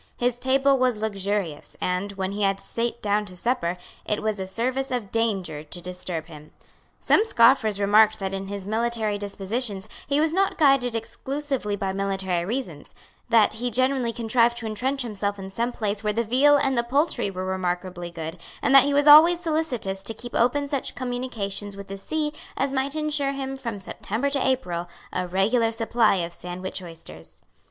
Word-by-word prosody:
His 245 Hz, 0 st, 0 dB
table 270 Hz, +1 st, +3 dB
was 250 Hz, -3 st, +2 dB
luxurious; 200 Hz, -6 st, -2 dB
and, 180 Hz, +3 st, -1 dB
when 190 Hz, -1 st, -3 dB
he 205 Hz, +1 st, -4 dB
had 195 Hz, -1 st, +1 dB
sate 235 Hz, +3 st, -3 dB
down 210 Hz, 0 st, +1 dB
to 185 Hz, -2 st, -8 dB
supper, 180 Hz, -4 st, -1 dB, 0.3 s
it 210 Hz, -, -1 dB
was 215 Hz, -2 st, -1 dB
a 190 Hz, -, -4 dB
service 255 Hz, +7 st, -2 dB
of 240 Hz, -6 st, -3 dB
danger 195 Hz, -9 st, -1 dB
to 155 Hz, +3 st, -6 dB
disturb 180 Hz, -2 st, -5 dB
him. 155 Hz, -2 st, -13 dB, 0.5 s
Some -, -, +4 dB
scoffers 230 Hz, -, +4 dB
remarked 215 Hz, +2 st, +5 dB
that 195 Hz, -1 st, -4 dB
in 195 Hz, 0 st, -4 dB
his 200 Hz, -1 st, -5 dB
military 220 Hz, -1 st, -1 dB
dispositions 205 Hz, +1 st, -4 dB, 0.2 s
he 280 Hz, +1 st, +2 dB
was 315 Hz, +1 st, +2 dB
not 390 Hz, +2 st, +1 dB
guided 270 Hz, -6 st, +3 dB
exclusively 265 Hz, -1 st, -3 dB
by 195 Hz, -1 st, -2 dB
military 190 Hz, -3 st, -1 dB
reasons, 190 Hz, -, -5 dB, 0.3 s
that 225 Hz, -3 st, +5 dB
he 240 Hz, +3 st, -2 dB
generally 255 Hz, 0 st, +1 dB
contrived 235 Hz, +1 st, +2 dB
to 235 Hz, -, -5 dB
entrench 255 Hz, +5 st, -1 dB
himself 205 Hz, -3 st, -3 dB
in 190 Hz, 0 st, -8 dB
some 235 Hz, +5 st, -1 dB
place 210 Hz, -3 st, -2 dB
where 210 Hz, 0 st, 0 dB
the 230 Hz, +2 st, 0 dB
veal 270 Hz, +6 st, +5 dB
and 275 Hz, -2 st, +2 dB
the 235 Hz, -, +3 dB
poultry 275 Hz, -2 st, 0 dB
were 185 Hz, -1 st, -5 dB
remarkably 180 Hz, -1 st, -3 dB
good, 165 Hz, 0 st, -7 dB, 0.2 s
and 275 Hz, -, +3 dB
that 275 Hz, -1 st, +9 dB
he 285 Hz, 0 st, +1 dB
was 290 Hz, 0 st, +3 dB
always 320 Hz, +4 st, +9 dB
solicitous 305 Hz, -, -2 dB
to 220 Hz, +3 st, -4 dB
keep 240 Hz, +2 st, -9 dB
open 285 Hz, +4 st, +2 dB
such 275 Hz, -2 st, -2 dB
communications 225 Hz, -6 st, -4 dB
with 200 Hz, -, -7 dB
the 195 Hz, -, -7 dB
sea 300 Hz, +8 st, -2 dB, 0.2 s
as 275 Hz, +1 st, 0 dB
might 270 Hz, +2 st, 0 dB
ensure 300 Hz, -2 st, 0 dB
him, 270 Hz, -1 st, -4 dB
from 230 Hz, -6 st, -5 dB
September 220 Hz, +7 st, -3 dB
to 275 Hz, -2 st, 0 dB
April, 180 Hz, -10 st, -1 dB, 0.2 s
a 180 Hz, 0 st, -2 dB
regular 225 Hz, +6 st, +2 dB
supply 225 Hz, -1 st, +2 dB
of 170 Hz, -2 st, -3 dB
Sandwich 180 Hz, +2 st, -5 dB
oysters. 165 Hz, -, -12 dB
220 Hz, 180 wpm, -25 LUFS, 195-260 Hz, 0.5 s, that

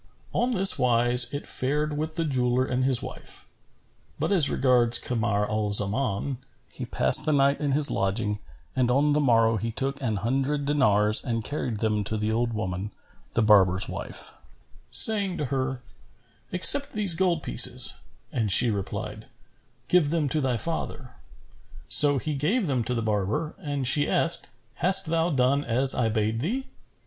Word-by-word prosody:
On 245 Hz, +2 st, -1 dB
this 195 Hz, -2 st, +5 dB
wise 120 Hz, 0 st, +3 dB
it 145 Hz, -, -7 dB
fared 150 Hz, +3 st, -2 dB
with 155 Hz, +1 st, -5 dB
the 165 Hz, -1 st, -2 dB
jeweller 125 Hz, -2 st, -1 dB
and 130 Hz, 0 st, -3 dB
his 130 Hz, -2 st, +4 dB
wife; -, -, -8 dB, 0.7 s
but -, -, -3 dB
as 170 Hz, -8 st, +6 dB
regards 125 Hz, -3 st, +2 dB
Kamar 110 Hz, -4 st, -3 dB
al 105 Hz, -1 st, -3 dB
Zaman, 105 Hz, +4 st, 0 dB, 0.3 s
he -, -, -10 dB
passed -, -, +1 dB
the 155 Hz, -, -2 dB
night 140 Hz, 0 st, 0 dB
in 145 Hz, -2 st, -2 dB
his 145 Hz, +1 st, +1 dB
lodging 105 Hz, +1 st, -3 dB, 0.4 s
and 125 Hz, -2 st, -1 dB
on 145 Hz, +4 st, +1 dB
the 150 Hz, -, 0 dB
morrow 115 Hz, -5 st, +1 dB
he 115 Hz, +2 st, -5 dB
took 135 Hz, +4 st, -5 dB
an 115 Hz, -5 st, -3 dB
hundred 135 Hz, +7 st, -3 dB
dinars 105 Hz, -7 st, +1 dB
and 115 Hz, -3 st, -4 dB
carried 120 Hz, -5 st, -5 dB
them 105 Hz, -2 st, -2 dB
to 110 Hz, +1 st, -2 dB
the 105 Hz, +1 st, -3 dB
old 115 Hz, +1 st, -2 dB
woman, 100 Hz, -2 st, -5 dB, 0.5 s
the 115 Hz, -, +1 dB
barber's 95 Hz, -4 st, +3 dB
wife, -, -, -7 dB, 0.6 s
saying 200 Hz, -4 st, +4 dB
to 150 Hz, -, -4 dB
her, 130 Hz, -1 st, -4 dB, 0.7 s
"Accept 280 Hz, +10 st, +3 dB
these 205 Hz, -4 st, +5 dB
gold 170 Hz, -2 st, -2 dB
pieces," -, -, +3 dB, 0.3 s
and 110 Hz, -5 st, -3 dB
she 120 Hz, +4 st, +3 dB
replied, 100 Hz, -2 st, -7 dB, 0.6 s
"Give 175 Hz, -5 st, +1 dB
them 160 Hz, -2 st, -2 dB
to 155 Hz, +3 st, -2 dB
thy 130 Hz, -3 st, -2 dB
father." 150 Hz, -3 st, -5 dB, 0.8 s
So 145 Hz, -, +6 dB
he 150 Hz, +4 st, -5 dB
gave 180 Hz, -, -2 dB
them 130 Hz, -6 st, -2 dB
to 125 Hz, -, -1 dB
the 115 Hz, -, -4 dB
barber 110 Hz, +9 st, -3 dB
and 145 Hz, -6 st, -5 dB
she 145 Hz, +3 st, +5 dB
asked, 165 Hz, -, +3 dB, 0.3 s
"Hast 190 Hz, +3 st, +4 dB
thou 165 Hz, +1 st, -2 dB
done 140 Hz, -1 st, 0 dB
as 130 Hz, +2 st, +3 dB
I 115 Hz, -3 st, -1 dB
bade 110 Hz, +1 st, -3 dB
thee?" 240 Hz, -, -4 dB
130 Hz, 165 wpm, -24 LUFS, 115-150 Hz, 0.8 s, as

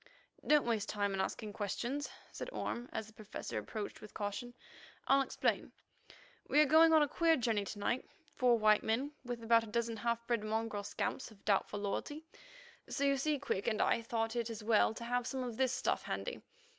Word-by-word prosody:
"Don't 300 Hz, -1 st, +5 dB
waste 225 Hz, -3 st, 0 dB
time 205 Hz, -1 st, 0 dB
in 190 Hz, -, 0 dB
asking 210 Hz, +1 st, -3 dB
questions," 240 Hz, +8 st, -2 dB, 0.2 s
said -, -, -6 dB
Orme 240 Hz, -, -4 dB
as 220 Hz, -, -3 dB
the 220 Hz, -, -16 dB
Professor 215 Hz, -1 st, -5 dB
approached 215 Hz, -2 st, -6 dB
with 210 Hz, -, -12 dB
caution. 240 Hz, +4 st, -4 dB, 0.5 s
"I'll 275 Hz, 0 st, +5 dB
explain. 270 Hz, -, -1 dB, 0.8 s
We 295 Hz, -, +4 dB
are 305 Hz, -, +8 dB
going 320 Hz, +3 st, +7 dB
on 315 Hz, -2 st, +7 dB
a -, -, +1 dB
queer 330 Hz, +3 st, +3 dB
journey 225 Hz, -5 st, 0 dB
to 205 Hz, -, -6 dB
night—four 245 Hz, +2 st, 0 dB
white 215 Hz, -1 st, +5 dB
men 250 Hz, +6 st, 0 dB
with 240 Hz, -2 st, -5 dB
about 230 Hz, 0 st, +5 dB
a -, -, -8 dB
dozen 230 Hz, +1 st, -1 dB
half 235 Hz, +1 st, -1 dB
bred 235 Hz, -3 st, 0 dB
mongrel 220 Hz, -1 st, -1 dB
scamps 225 Hz, -, -3 dB
of 210 Hz, -3 st, -19 dB
doubtful 205 Hz, 0 st, +1 dB
loyalty, 290 Hz, +10 st, -3 dB, 0.6 s
so 280 Hz, -, -1 dB
you 280 Hz, 0 st, +4 dB
see 295 Hz, +2 st, +1 dB
Quick 200 Hz, -6 st, -2 dB
and 220 Hz, -2 st, +1 dB
I 230 Hz, -, +3 dB
thought 225 Hz, 0 st, -2 dB
it 235 Hz, -1 st, -1 dB
as 225 Hz, -1 st, -6 dB
well 220 Hz, 0 st, +3 dB
to 235 Hz, -, -7 dB
have 245 Hz, +1 st, -1 dB
some 265 Hz, -2 st, -2 dB
of 240 Hz, -3 st, -4 dB
this 260 Hz, -2 st, +2 dB
stuff -, -, 0 dB
handy. -, -, -4 dB
235 Hz, 195 wpm, -35 LUFS, 215-260 Hz, 0.8 s, are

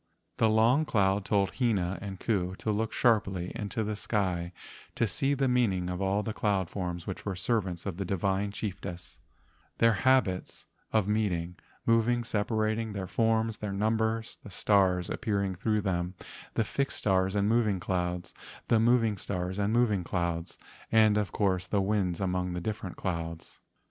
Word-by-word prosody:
The 110 Hz, -, +4 dB
Long 115 Hz, +7 st, +4 dB
Cloud 100 Hz, -7 st, +1 dB
told 100 Hz, -2 st, +2 dB
Hina 95 Hz, -7 st, +1 dB
and 95 Hz, -2 st, -6 dB
Ku 95 Hz, -5 st, -1 dB
to 110 Hz, -, -2 dB
look 110 Hz, +1 st, -1 dB
sharply 100 Hz, -7 st, +1 dB
into 110 Hz, +2 st, -3 dB
the 105 Hz, 0 st, -2 dB
sky 90 Hz, -5 st, -1 dB, 0.4 s
to 120 Hz, -, +2 dB
see 135 Hz, +7 st, 0 dB
the 135 Hz, 0 st, +1 dB
meaning 100 Hz, -8 st, +1 dB
of 90 Hz, +1 st, -4 dB
all 100 Hz, +2 st, +1 dB
the 110 Hz, -, -3 dB
cloud 100 Hz, -5 st, 0 dB
forms 90 Hz, -3 st, -4 dB
which 95 Hz, -, -5 dB
were 100 Hz, -2 st, -3 dB
servants 95 Hz, -3 st, -1 dB
of 95 Hz, -4 st, -4 dB
the 100 Hz, -, -2 dB
divine 95 Hz, +2 st, 0 dB
chiefess, 95 Hz, -4 st, -6 dB, 0.6 s
their 115 Hz, 0 st, +5 dB
habits 105 Hz, -3 st, +1 dB, 0.3 s
of 110 Hz, -3 st, +2 dB
meeting, 90 Hz, -5 st, 0 dB, 0.3 s
moving, 115 Hz, +1 st, +3 dB
sepa¬ 110 Hz, 0 st, -1 dB
rating, 110 Hz, 0 st, 0 dB
their 100 Hz, -2 st, -3 dB
forms, 110 Hz, +2 st, +1 dB
their 105 Hz, -2 st, -4 dB
number, 110 Hz, +2 st, +1 dB, 0.2 s
the -, -, -11 dB
stars 95 Hz, -3 st, +2 dB
ap¬ -, -, -5 dB
pearing 100 Hz, -3 st, 0 dB
through 105 Hz, +4 st, 0 dB
them, 90 Hz, -2 st, -1 dB, 0.4 s
the 115 Hz, -, +2 dB
fixed 140 Hz, +6 st, -2 dB
stars 95 Hz, -1 st, +1 dB
and 100 Hz, 0 st, +2 dB
moving 110 Hz, -4 st, +2 dB
clouds, 90 Hz, -1 st, -2 dB, 0.4 s
the 115 Hz, -, +5 dB
moving 115 Hz, -3 st, +3 dB
stars 90 Hz, +1 st, -3 dB
and 100 Hz, +1 st, +1 dB
moving 110 Hz, -5 st, +2 dB
clouds, 85 Hz, -1 st, -2 dB, 0.3 s
the 105 Hz, -3 st, +4 dB
course 95 Hz, -3 st, +1 dB
of -, -, -21 dB
the 100 Hz, -, +2 dB
winds 95 Hz, -3 st, 0 dB
among 90 Hz, -1 st, -1 dB
the 90 Hz, -, -3 dB
different 100 Hz, -1 st, -4 dB
clouds. 85 Hz, -2 st, -5 dB
100 Hz, 170 wpm, -29 LUFS, 90-110 Hz, 0.6 s, their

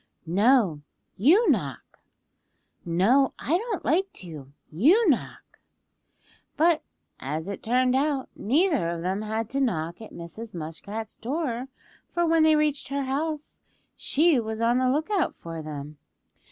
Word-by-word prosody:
"No, 195 Hz, -, +3 dB, 0.3 s
you 330 Hz, -, +4 dB
knock." -, -, -3 dB, 0.8 s
"No, 205 Hz, +11 st, +3 dB
I 315 Hz, -, 0 dB
don't 425 Hz, +1 st, -2 dB
like 380 Hz, +5 st, +1 dB
to; 150 Hz, -7 st, -9 dB, 0.2 s
you 330 Hz, -, +4 dB
knock." 255 Hz, -, -5 dB, 1.0 s
But 325 Hz, +1 st, +4 dB, 0.4 s
as 155 Hz, +5 st, -4 dB
it 200 Hz, -, -5 dB
turned 250 Hz, +2 st, +2 dB
out 275 Hz, -1 st, 0 dB
neither 290 Hz, -, +1 dB
of 170 Hz, -1 st, -4 dB
them 190 Hz, +3 st, -1 dB
had 220 Hz, +1 st, -2 dB
to 275 Hz, +1 st, 0 dB
knock 170 Hz, -7 st, -1 dB
at 220 Hz, -, -10 dB
Mrs. 180 Hz, +6 st, -8 dB
Muskrat's 200 Hz, +7 st, -6 dB
door, 255 Hz, -1 st, -3 dB, 0.4 s
for 345 Hz, 0 st, 0 dB
when 330 Hz, 0 st, +3 dB
they 315 Hz, 0 st, +5 dB
reached 300 Hz, -2 st, 0 dB
her 280 Hz, 0 st, -2 dB
house 300 Hz, +3 st, -3 dB, 0.4 s
she 310 Hz, -2 st, +2 dB
was 220 Hz, -1 st, -4 dB
on 235 Hz, +2 st, +2 dB
the 255 Hz, 0 st, +2 dB
lookout 315 Hz, +6 st, 0 dB
for 165 Hz, -1 st, -7 dB
them. 150 Hz, -1 st, -8 dB
250 Hz, 140 wpm, -26 LUFS, -, 1.0 s, they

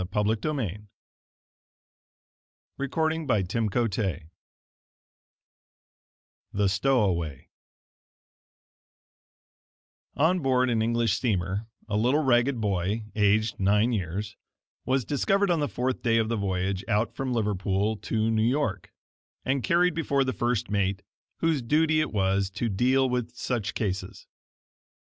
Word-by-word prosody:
Brother 105 Hz, +1 st, +1 dB
H. 110 Hz, -, -5 dB
P. -, -, -2 dB
in 105 Hz, -, -3 dB, 2.0 s
Christian 160 Hz, 0 st, -1 dB
Advocate 105 Hz, -3 st, 0 dB, 2.3 s
THE 100 Hz, 0 st, +2 dB
STOWAWAY 95 Hz, -, 0 dB, 2.7 s
On 165 Hz, +6 st, +3 dB
board 130 Hz, -3 st, +2 dB
an 115 Hz, -2 st, +1 dB
English 115 Hz, -2 st, +1 dB
steamer 100 Hz, -2 st, -1 dB, 0.2 s
a 105 Hz, -, -2 dB
little 130 Hz, +8 st, +2 dB
ragged 125 Hz, 0 st, +2 dB
boy, 100 Hz, +1 st, -1 dB
aged 105 Hz, +1 st, +2 dB
nine 105 Hz, +5 st, +3 dB
years, 100 Hz, +1 st, -3 dB, 0.5 s
was 130 Hz, -2 st, +1 dB
discovered 195 Hz, -, +1 dB
on 170 Hz, -, +2 dB
the 145 Hz, -, 0 dB
fourth 125 Hz, +1 st, -2 dB
day 115 Hz, -1 st, +2 dB
of 110 Hz, -1 st, +1 dB
the 115 Hz, -, 0 dB
voyage 95 Hz, -1 st, -1 dB
out 110 Hz, +1 st, +1 dB
from 135 Hz, -1 st, -3 dB
Liverpool 105 Hz, -2 st, 0 dB
to 110 Hz, +1 st, -1 dB
New 110 Hz, -1 st, +1 dB
York, 115 Hz, -, 0 dB, 0.5 s
and 130 Hz, +1 st, +1 dB
carried 170 Hz, +8 st, +3 dB
before 140 Hz, -4 st, +1 dB
the 130 Hz, -1 st, -2 dB
first 120 Hz, 0 st, -1 dB
mate, 100 Hz, 0 st, 0 dB, 0.4 s
whose 165 Hz, -4 st, +2 dB
duty 155 Hz, +5 st, +2 dB
it 155 Hz, -, -2 dB
was 95 Hz, -1 st, +1 dB
to 115 Hz, +5 st, -2 dB
deal 130 Hz, +6 st, +2 dB
with 125 Hz, -1 st, -2 dB
such 120 Hz, -5 st, -3 dB
cases. 95 Hz, -3 st, -3 dB
115 Hz, 120 wpm, -27 LUFS, 100-130 Hz, 2.7 s, On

